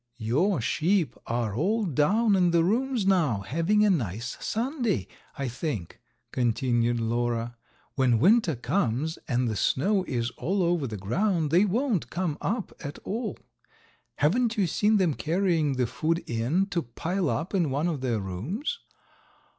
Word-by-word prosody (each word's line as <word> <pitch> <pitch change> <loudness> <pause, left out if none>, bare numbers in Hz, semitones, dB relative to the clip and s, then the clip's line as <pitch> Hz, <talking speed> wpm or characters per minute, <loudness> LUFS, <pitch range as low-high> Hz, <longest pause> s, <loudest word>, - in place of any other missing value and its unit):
"Your 130 - +1
sheep 160 - +1
are 115 -3 -1
all 210 - +1
down 195 - +2
in 180 -2 +3
the 170 -1 +3
rooms 235 +3 +1
now, 160 - +2
having 165 - +2
a - - +4
nice 115 - -2
Sunday, 240 -1 -1 0.3
I 140 -2 -2
think," 120 - -4 0.3
continued 120 -1 +1
Lora. 120 +1 -1 0.4
"When 130 -4 +3
winter 185 - +4
comes 140 - -1
and 125 -2 +1
the 110 - -1
snow 195 - +1
is 120 -4 -2
all 190 +2 0
over 170 -5 +1
the 110 -2 -5
ground 160 - 0
they 180 +5 +5
won't 220 - 0
come 170 -4 -2
up 215 0 -2
at 145 +1 -6
all. 220 -1 -3 0.8
Haven't 225 - +1
you 200 - +3
seen 210 +6 +2
them 180 -6 +2
carrying 165 -3 +1
food 155 +8 -1
in 120 +12 0
to 175 - 0
pile 165 +7 -2
up 165 +6 -2
in 175 -6 +2
one 145 +5 0
of 155 -6 -2
their 120 -4 0
rooms?" 145 - -4
160 Hz, 150 wpm, -27 LUFS, 120-195 Hz, 0.8 s, they